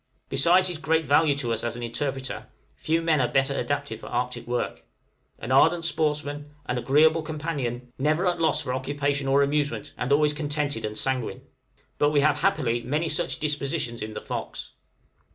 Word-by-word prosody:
Besides 180 +6 +4
his 175 -3 -3
great 160 +1 +1
value 145 +1 +4
to 120 -4 -1
us 115 - -3
as 120 0 -2
interpreter, 130 +3 -4 0.3
few 165 +1 -1
men 160 -4 +3
are 125 - +2
better 135 +2 +1
adapted 140 -5 -2
for - - -10
Arctic 125 -1 -3
work, 120 0 -2 0.5
an 115 - -6
ardent 165 +5 +4
sportsman, 150 -2 -1
an 125 -2 -1
agreeable 155 +5 +4
companion, 145 -6 -4
never 155 +6 +2
at 175 -1 +1
a - - -3
loss 160 - +2
for 125 - -2
occupation 140 +1 -1
or 140 +1 +4
amusement, 145 -6 -1
and 125 +2 -2
always 150 +1 +4
contented 145 -5 -2
and 105 0 -4
sanguine. 130 0 -2 0.6
But 145 - +4
we 145 -1 +3
have 150 0 +3
happily 130 -11 +1
many 150 +7 -1
such 155 - -1
dispositions 140 -5 -2
in 110 0 -5
the - - -4
'Fox.' - - -6
145 Hz, 175 wpm, -26 LUFS, 125-155 Hz, 0.6 s, Besides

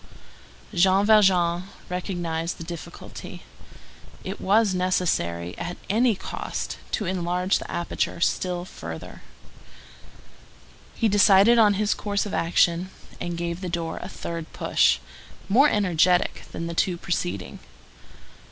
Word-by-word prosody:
Jean 190 +2 +4
Valjean 185 -5 +4 0.2
recognized 175 -2 -3
the - - -7
difficulty. 170 -1 -9 0.8
It - - -6
was 205 +1 +3
necessary, 160 - 0
at 175 +1 -5
any 230 +1 +3
cost, 190 - -5
to 210 - 0
enlarge 180 +1 0
the - - -9
aperture 175 0 -2
still 175 +1 0
further. 85 - -9 1.7
He 225 - +2
decided 205 +3 +6
on 210 -2 +5
his 210 +1 +1
course 205 -1 -2
of 205 - -6
action, 170 +1 +2 0.3
and 175 -1 -4
gave 170 +1 -3
the 185 - -4
door 165 -1 -3
a - - -7
third 165 -1 -6
push, 65 - +3 0.5
more 260 +9 +5
energetic 180 -3 +2
than 165 - -5
the 170 - -4
two 175 +1 +1
preceding. 100 - -3
180 Hz, 120 wpm, -25 LUFS, 170-195 Hz, 1.7 s, decided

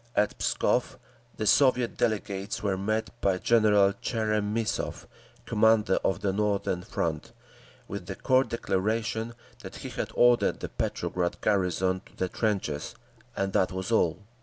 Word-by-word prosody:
At 105 0 +2
Pskov, - - 0 0.4
the 110 - -2
Soviet 125 -2 +4
delegates 100 -2 -2
were 100 -2 +1
met 110 +4 -1
by 95 -2 +2
General 105 -2 +4
Tcheremissov, 110 0 -2 0.4
commander 110 -2 +3
of 95 - 0
the 95 -2 0
Northern 100 -3 0
Front, - - -3 0.6
with 100 -2 -6
the 95 - -4
curt 130 0 +2
declaration 110 +2 -1 0.3
that - - -9
he - - -4
had - - -4
ordered 120 0 +4
the - - -5
Petrograd 90 -1 -2
garrison 95 -2 +1
to - - -22
the 95 - -1
trenches, 95 -7 -2 0.4
and 95 0 -1
that 95 - +2
was 95 +2 -4
all. 110 -2 +2
105 Hz, 135 wpm, -28 LUFS, 95-110 Hz, 0.6 s, Soviet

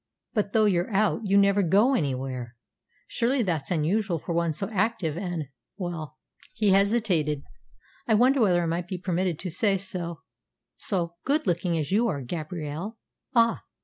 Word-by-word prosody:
"But 210 -3 0
though 220 -1 +4
you're 180 -3 +1
out, 215 +1 +1
you 200 0 +3
never 200 0 +4
go 200 +9 +4
anywhere. 130 - -2 0.5
Surely 250 +2 +1
that's 165 -7 -2
unusual 180 +3 +1
for 170 - -5
one 170 -1 +1
so 155 +6 -3
active 195 -6 0
and 175 -6 -4 0.3
well" 165 -5 -5 0.4
he 215 -3 +2
hesitated 190 -8 +2 0.6
"I 220 - +4
wonder 255 +4 +4
whether 180 -5 +3
I - - -1
might 170 +1 -2
be 185 - -4
permitted 180 -2 -1
to 180 +1 -5
say 195 +3 +2
so 180 -3 -3 0.5
so 170 -4 -3
good 295 +4 +1
looking 175 -2 0
as 155 +2 -2
you 225 +4 +3
are, 145 -10 -2
Gabrielle." 160 - -5 0.4
"Ah!" 230 -1 +3
180 Hz, 160 wpm, -26 LUFS, 165-210 Hz, 0.6 s, though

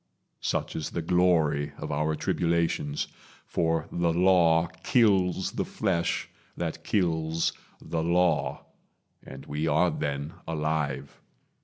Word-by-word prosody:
Such - - -2
is 80 - -3
the 85 - -3
glory 80 -4 +2
of - - -5
our 75 +2 0
tribulations; 85 -4 0 0.4
For 80 -1 0
the 85 -1 +1
Law 85 -2 +4 0.2
kills 95 -7 +3
the - - -1
flesh 85 0 -1 0.3
that - - -3
kills 80 -4 0 0.3
the 80 - -3
Law, 85 -2 +1 0.6
And - - -10
we 75 +2 -2
are 80 +3 +3
then 70 +1 -3
alive. 75 -4 -2
80 Hz, 115 wpm, -27 LUFS, 75-90 Hz, 0.6 s, Law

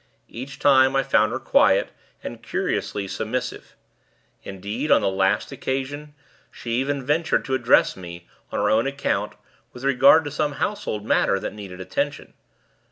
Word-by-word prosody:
Each 130 +3 -8
time, 130 -1 +4
I 135 - +3
found 110 -5 +2
her - - -2
quiet, - - +3 0.3
and - - -7
curiously 100 -1 -2
submissive. 125 +6 -4 0.7
Indeed, 105 +9 -5
on - - +5
the - - +1
last 95 +4 0
occasion, 140 +2 -4 0.3
she 120 - -8
even 135 +2 -1
ventured 160 +4 +1
to 135 - -3
address 125 -2 +3
me, 85 -2 -10 0.2
on - - -3
her - - +1
own 115 +4 +2
account, 140 0 -2 0.4
with 125 - -11
regard 140 +4 +5
to 145 - -5
some 145 0 -1
household 110 - -3
matter 100 - +2
that - - -5
needed 100 -3 -9
attention. 95 0 -3
130 Hz, 155 wpm, -23 LUFS, 105-140 Hz, 0.7 s, on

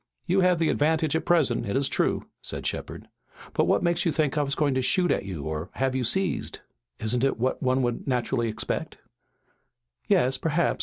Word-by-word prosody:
"You 185 +2 +2
have 180 -1 +4
the 165 -1 +1
advantage 155 0 +1
at 160 - -1
present, 150 -12 +2
it 100 - -2
is 135 0 +2
true," - - 0 0.2
said - - -3
Shepard, - - -4 0.5
"but - - +2
what - - +2
makes 170 0 +1
you 170 - +2
think 150 -2 0
I 150 - +2
was 140 -1 -1
going 145 -3 +1
to 130 - +1
shoot 180 +6 +2
at - - 0
you 90 -7 -5
or 80 +3 -4
have 135 0 0
you 130 - 0
seized?" 185 +10 0 0.4
"Isn't 120 +3 -1
it 135 - +2
what 130 +3 -1
one 130 0 +2
would 120 +2 -2
naturally 125 -2 0
expect?" 110 - -3 1.1
"Yes 130 +1 +3
perhaps. 165 +2 0
135 Hz, 200 wpm, -26 LUFS, 125-160 Hz, 1.1 s, have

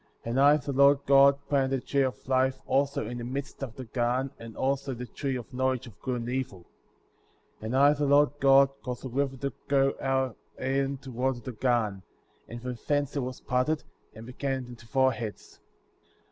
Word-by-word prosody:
And 120 +3 0
I, 145 +2 +6
the 145 -1 -5
Lord 140 +1 +6
God, 140 0 +6
planted 135 -2 +2
the 135 -2 -2
tree 140 - +1
of 130 -2 -2
life"* 130 0 +2
also 135 -2 +1
in 120 +2 -5
the - - -5
midst 135 +4 -5
of 125 -5 -5
the 130 - -7
garden, 125 +3 -1
and 115 -1 -10
also 135 0 -1
the 125 +1 -6
tree 135 +2 -3
of 125 0 -7
knowledge 130 -1 0
of 110 -4 -15
good 125 -2 -2
and 115 - -6
evil. 125 -9 -4 0.9
10. 110 - -6
And 125 +4 0
I, 140 +2 +6
the 145 -1 -1
Lord 145 +1 +5
God, 135 0 +6
caused 125 0 -6
a - - -4
river 135 +1 -1
to 140 0 -3
go 135 -1 +3
out 135 -1 +1
of 115 - -17 0.3
Eden 135 +1 0
to 130 - -8
water 125 +1 -1
the 130 - -6
garden; 115 -5 0 0.5
and 120 - -7
from 125 -2 -5
thence 145 -1 0
it - - +1
was 130 -1 -5
parted, 130 +5 0 0.3
and 110 +1 -10
became 130 +1 -3
into 120 -2 -12
four 130 +3 +3
heads. 110 -3 -7
130 Hz, 205 wpm, -28 LUFS, 125-140 Hz, 0.9 s, I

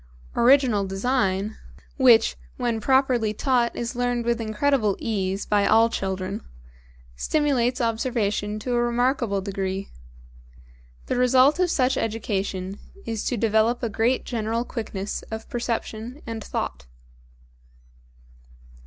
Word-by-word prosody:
Original 245 -4 +4
design, 195 0 -1 0.4
which 245 -4 +5 0.2
when 235 -3 -1
properly 250 -4 +2
taught 245 -1 +1
is 235 +1 -4
learned 245 -1 -1
with 235 0 0
incredible 215 -1 +1
ease 195 -3 -2
by 205 -1 +2
all 225 +1 +5
children, 190 0 -3 0.7
stimulates 260 - +1
observation 225 -3 -1
to 245 +4 -3
a 240 - +2
remarkable 240 -3 +1
degree. 195 0 -4 1.1
The - - -1
result 255 +5 +4
of 365 -1 +3
such 260 -3 +2
education 200 -3 -2 0.3
is 225 -2 -3
to 245 - -1
develop 225 +3 +2
a 235 - 0
great 225 +4 +1
general 230 0 -2
quickness 210 -5 -4
of 220 0 -6
perception 235 +2 -4
and 225 -2 -5
thought. - - -4
230 Hz, 115 wpm, -24 LUFS, 205-245 Hz, 1.1 s, which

